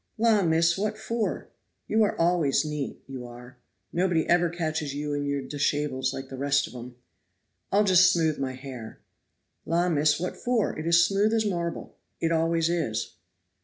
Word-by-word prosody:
"La, 220 Hz, -2 st, +4 dB
miss, 165 Hz, +1 st, +2 dB
what 215 Hz, +1 st, -1 dB
for? 220 Hz, 0 st, -3 dB, 0.4 s
you 220 Hz, -, +2 dB
are 210 Hz, -, +1 dB
always 165 Hz, -4 st, +2 dB
neat, 150 Hz, -2 st, -5 dB
you 130 Hz, -2 st, -7 dB
are 125 Hz, +1 st, -12 dB, 0.4 s
nobody 175 Hz, -2 st, +1 dB
ever 175 Hz, 0 st, +3 dB
catches 155 Hz, -4 st, -3 dB
you 145 Hz, 0 st, -3 dB
in 145 Hz, 0 st, -2 dB
your 140 Hz, -1 st, -1 dB
dishables 145 Hz, -2 st, -1 dB
like 135 Hz, 0 st, -6 dB
the 135 Hz, -, -8 dB
rest 140 Hz, 0 st, +2 dB
of -, -, -11 dB
'em." 125 Hz, 0 st, -9 dB, 0.8 s
"I'll 205 Hz, +2 st, +4 dB
just 185 Hz, -2 st, +6 dB
smooth 160 Hz, -3 st, +1 dB
my 130 Hz, -1 st, -2 dB
hair." 130 Hz, -4 st, -9 dB, 0.6 s
"La, 175 Hz, +2 st, +1 dB
miss, 150 Hz, -2 st, +2 dB
what 180 Hz, -, -3 dB
for? 245 Hz, -4 st, 0 dB
it 155 Hz, -, -4 dB
is 170 Hz, 0 st, +5 dB
smooth 200 Hz, +4 st, +2 dB
as 220 Hz, -1 st, +1 dB
marble 170 Hz, -4 st, -3 dB, 0.3 s
it 165 Hz, -, 0 dB
always 165 Hz, 0 st, +1 dB
is." 160 Hz, -11 st, -2 dB
165 Hz, 170 wpm, -26 LUFS, 140-180 Hz, 0.8 s, just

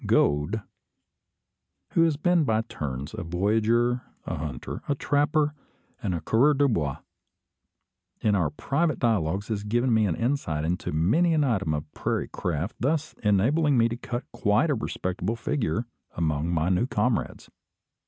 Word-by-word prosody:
Gode, 75 Hz, +10 st, +2 dB, 1.3 s
who -, -, +3 dB
has 155 Hz, -3 st, +1 dB
been 175 Hz, +1 st, +3 dB
by 110 Hz, -5 st, +2 dB
turns 70 Hz, -, -5 dB
a 110 Hz, -, -5 dB
voyageur, 110 Hz, +8 st, +1 dB, 0.2 s
a -, -, -3 dB
hunter, 75 Hz, -5 st, -5 dB
a 140 Hz, -, +2 dB
trapper, 145 Hz, +2 st, +1 dB, 0.5 s
and 95 Hz, -7 st, -1 dB
a 85 Hz, -, -3 dB
coureur 130 Hz, -, +3 dB
du 140 Hz, +1 st, +3 dB
bois, 75 Hz, -, 0 dB, 1.2 s
in 105 Hz, -, +2 dB
our 90 Hz, -5 st, +2 dB
private 150 Hz, +1 st, 0 dB
dialogues 100 Hz, -4 st, 0 dB
had 105 Hz, -1 st, -3 dB
given 120 Hz, +2 st, +2 dB
me 110 Hz, -2 st, +3 dB
an 85 Hz, -, 0 dB
insight 115 Hz, -, -1 dB
into 90 Hz, +2 st, -2 dB
many 125 Hz, -, +3 dB
an 150 Hz, -, +3 dB
item 100 Hz, -, +1 dB
of 75 Hz, 0 st, -6 dB
prairie -, -, -2 dB
craft, 85 Hz, +4 st, -3 dB
thus 155 Hz, +3 st, 0 dB
enabling 130 Hz, +9 st, +3 dB
me 115 Hz, 0 st, +5 dB
to 115 Hz, -, -3 dB
cut 120 Hz, +1 st, -4 dB
quite 105 Hz, +10 st, +2 dB
a -, -, +3 dB
respectable 95 Hz, -3 st, -2 dB
figure 115 Hz, -2 st, -1 dB, 0.3 s
among 80 Hz, -1 st, 0 dB
my 85 Hz, 0 st, +1 dB
new 95 Hz, +7 st, +2 dB
comrades. 125 Hz, -3 st, -1 dB
110 Hz, 155 wpm, -26 LUFS, 85-140 Hz, 1.3 s, me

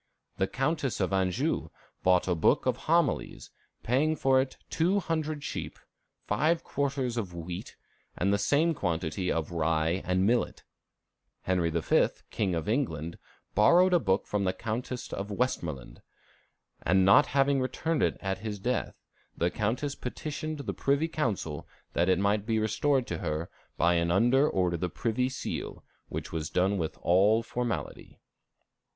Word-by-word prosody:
The 95 Hz, -, +1 dB
Countess 135 Hz, -, -1 dB
of 95 Hz, -1 st, 0 dB
Anjou 95 Hz, -2 st, 0 dB, 0.3 s
bought 90 Hz, 0 st, +3 dB
a 90 Hz, -, +2 dB
book 80 Hz, -, +2 dB
of -, -, +2 dB
Homilies, -, -, +1 dB, 0.3 s
paying 145 Hz, +6 st, +2 dB
for 135 Hz, -2 st, +3 dB
it 130 Hz, 0 st, -5 dB
two 180 Hz, +5 st, +2 dB
hundred 155 Hz, -4 st, -2 dB
sheep, -, -, -5 dB, 0.5 s
five 155 Hz, +11 st, +1 dB
quarters 135 Hz, -4 st, -2 dB
of 95 Hz, -6 st, -3 dB
wheat, 85 Hz, +1 st, -6 dB, 0.4 s
and 100 Hz, +2 st, +2 dB
the 100 Hz, -, +2 dB
same 155 Hz, +10 st, +2 dB
quantity 90 Hz, -, -2 dB
of 80 Hz, 0 st, -2 dB
rye 80 Hz, +2 st, +1 dB
and 90 Hz, +1 st, +1 dB
millet. 120 Hz, +3 st, +1 dB, 0.8 s
Henry 90 Hz, -2 st, +1 dB
V., 80 Hz, 0 st, +3 dB, 0.2 s
King 95 Hz, -5 st, 0 dB
of 80 Hz, +2 st, -3 dB
England, 85 Hz, -, -1 dB, 0.3 s
borrowed 175 Hz, -, +5 dB
a 175 Hz, -, +6 dB
book 95 Hz, -7 st, +1 dB
from 105 Hz, -1 st, -1 dB
the 95 Hz, -1 st, +1 dB
Countess 120 Hz, +5 st, -4 dB
of 100 Hz, +1 st, -4 dB
Westmoreland; 85 Hz, -, -3 dB, 0.8 s
and 95 Hz, +2 st, +3 dB
not 145 Hz, +10 st, +6 dB
having 140 Hz, 0 st, +2 dB
returned 150 Hz, +5 st, -1 dB
it -, -, +1 dB
at 95 Hz, -1 st, -2 dB
his 105 Hz, 0 st, -4 dB
death, 120 Hz, +6 st, -2 dB, 0.4 s
the 85 Hz, +1 st, +1 dB
Countess 120 Hz, +7 st, -1 dB
petitioned 150 Hz, +3 st, -5 dB
the -, -, -4 dB
Privy 140 Hz, +3 st, +1 dB
Council 110 Hz, -, -2 dB, 0.3 s
that 85 Hz, +2 st, +2 dB
it 95 Hz, -, +4 dB
might 100 Hz, +2 st, +1 dB
be 110 Hz, -1 st, +1 dB
restored 130 Hz, +5 st, +1 dB
to 85 Hz, -6 st, -4 dB
her 80 Hz, 0 st, -3 dB, 0.3 s
by 85 Hz, +2 st, +3 dB
an 85 Hz, 0 st, +1 dB
order 120 Hz, -, +4 dB
under 90 Hz, -2 st, +1 dB
the 90 Hz, +2 st, -2 dB
privy 120 Hz, +7 st, -1 dB
seal, 130 Hz, -, -5 dB, 0.3 s
which -, -, -5 dB
was 80 Hz, -2 st, -3 dB
done 95 Hz, +2 st, +1 dB
with 80 Hz, -2 st, -3 dB
all 100 Hz, +6 st, +4 dB
formality. 120 Hz, +1 st, -4 dB
105 Hz, 155 wpm, -29 LUFS, 90-135 Hz, 0.8 s, a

